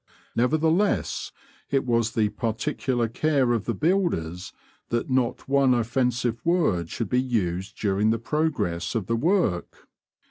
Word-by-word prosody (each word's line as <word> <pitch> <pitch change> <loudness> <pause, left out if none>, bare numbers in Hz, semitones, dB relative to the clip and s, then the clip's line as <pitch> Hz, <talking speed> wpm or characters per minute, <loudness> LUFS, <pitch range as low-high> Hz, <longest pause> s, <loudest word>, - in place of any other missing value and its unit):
Nevertheless, 160 - +1 0.4
it 135 -1 +1
was 115 -2 +1
the 110 -2 +2
particular 120 +2 -1
care 135 0 +1
of 115 -3 -1
the 115 - -1
builders 95 - 0 0.4
that 120 +3 -1
not 130 -2 0
one 135 -2 +4
offensive 120 0 0
word 155 - +1
should 115 - -3
be 125 +5 +2
used 95 -6 -2
during 105 +1 +1
the 115 - +2
progress 125 - -1
of 110 -5 -1
the 115 - 0
work. 130 - 0
120 Hz, 135 wpm, -25 LUFS, 110-140 Hz, 0.4 s, one